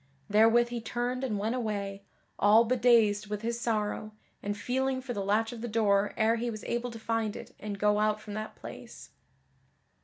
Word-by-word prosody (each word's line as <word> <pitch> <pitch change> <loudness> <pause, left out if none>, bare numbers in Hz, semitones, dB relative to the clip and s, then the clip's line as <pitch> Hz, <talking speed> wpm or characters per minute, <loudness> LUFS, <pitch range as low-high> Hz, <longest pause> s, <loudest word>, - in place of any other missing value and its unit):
Therewith 225 +3 +5
he 240 -1 -4
turned 245 +3 -2
and 225 -6 -1
went 215 +3 -1
away, 200 -5 -3 0.4
all 215 +3 +6
bedazed 225 -4 +3
with 210 +1 -4
his 235 +1 -2
sorrow, 215 -2 -2 0.3
and 205 0 -3
feeling 260 +4 -1
for 255 -1 -5
the 200 -3 -3
latch 215 +3 +1
of 235 -2 -8
the 240 - -3
door 210 -2 +2
ere 225 +1 +3
he 240 +1 -2
was 215 -2 -6
able 240 +1 -2
to 230 - -8
find 225 -1 -1
it - - -9
and 205 -1 -5
go 210 +1 +2
out 215 0 +2
from 210 -1 -9
that 215 +1 -5
place. - - -10
220 Hz, 190 wpm, -29 LUFS, 210-235 Hz, 0.4 s, all